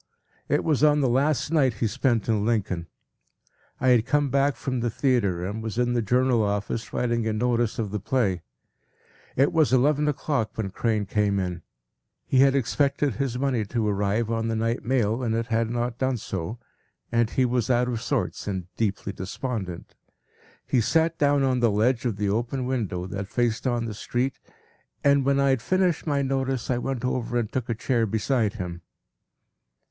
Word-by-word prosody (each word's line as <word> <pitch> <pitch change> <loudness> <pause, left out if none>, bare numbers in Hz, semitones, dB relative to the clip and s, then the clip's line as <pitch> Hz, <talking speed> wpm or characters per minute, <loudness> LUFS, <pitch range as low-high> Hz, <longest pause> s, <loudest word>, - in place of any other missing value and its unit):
It - - +2
was 150 -3 +1
on 150 -1 +5
the 135 - +3
last 135 +3 +1
night 135 -8 +3
he 105 - -1
spent 115 +1 0
in 110 -3 +1
Lincoln. 95 -7 -1 0.9
I 130 - +2
had 120 -3 +5
come 145 0 +1
back 140 0 +2
from 130 -2 -3
the 120 0 0
theatre 105 -9 +1
and 105 +4 -4
was 110 0 -5
in 120 0 +1
the 120 - +1
Journal 125 +2 +2
office 105 +2 -2
writing 120 -2 0
a 110 - 0
notice 120 0 0
of 105 -4 -2
the 105 - -2
play. 100 -5 0 0.9
It 140 +3 +3
was 160 -4 +3
eleven 145 +3 +3
o’clock 140 -5 -1
when 100 -4 -2
Crane 110 0 0
came 100 0 +1
in. 90 -2 -3 0.6
He 130 - +2
had 135 0 +5
expected 140 +1 +1
his 130 -3 -1
money 130 -4 0
to 110 +1 -1
arrive 105 +3 0
on 115 0 -1
the 115 - -1
night 115 +2 -1
mail 120 -2 +1
and 115 -3 0
it 115 0 -1
had 115 -1 0
not 120 0 -2
done 130 -1 +1
so, 110 +1 -5 0.5
and 115 -1 +2
he 130 - +1
was 125 -1 0
out 125 0 +3
of 120 -2 -2
sorts - - -2
and 95 -3 -3
deeply 100 -2 -1
despondent. 95 -2 -5 0.7
He 125 - +2
sat 165 +7 +1
down 145 -1 +3
on 130 -2 +2
the 120 -1 +3
ledge 115 +4 +1
of 115 -5 -1
the 105 -1 -1
open 120 +5 -1
window 110 -9 -2
that 100 +1 -5
faced 120 +3 0
on 120 -2 0
the 110 - -4
street, 120 +4 -2 0.6
and 140 -1 +4
when 140 0 +3
I 140 0 +3
had 130 -3 +1
finished 180 +4 +1
my 140 -2 +1
notice 135 -2 -1
I 120 - +1
went 130 -1 -3
over 120 -1 -1
and 115 -2 -1
took 125 -3 -3
a 115 - 0
chair 115 0 0
beside 110 +1 0
him. 90 -4 -5
120 Hz, 190 wpm, -25 LUFS, 110-130 Hz, 0.9 s, on